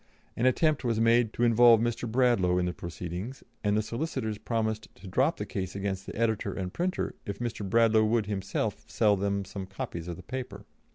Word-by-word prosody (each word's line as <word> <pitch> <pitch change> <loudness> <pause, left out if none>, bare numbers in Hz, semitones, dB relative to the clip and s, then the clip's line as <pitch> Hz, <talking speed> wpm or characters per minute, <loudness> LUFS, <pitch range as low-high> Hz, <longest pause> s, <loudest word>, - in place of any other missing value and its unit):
An 120 - +2
attempt 150 +3 +2
was 115 -3 0
made 115 0 +4
to 120 - -1
involve 120 -1 +7
Mr. 120 0 -1
Bradlaugh 115 -8 +3
in 90 - +1
the 90 - -1
proceedings, 90 - -6 0.2
and 105 0 +2
the 110 - +1
solicitors 115 -3 -3
promised 110 -2 -2
to - - -15
drop 90 - +2
the - - -3
case 95 -1 -4
against 95 -1 -3
the - - -6
editor 110 -1 0
and 90 -2 -4
printer 180 +2 -1
if 100 - -3
Mr. 120 -3 -4
Bradlaugh 110 +1 +4
would 110 0 +2
himself 100 -1 -2
sell 105 -2 +3
them 100 0 -1
some 95 0 -6
copies 85 -3 -6
of 85 - -4
the 90 - -11
paper. 120 -4 -6
110 Hz, 195 wpm, -29 LUFS, 95-120 Hz, 0.2 s, involve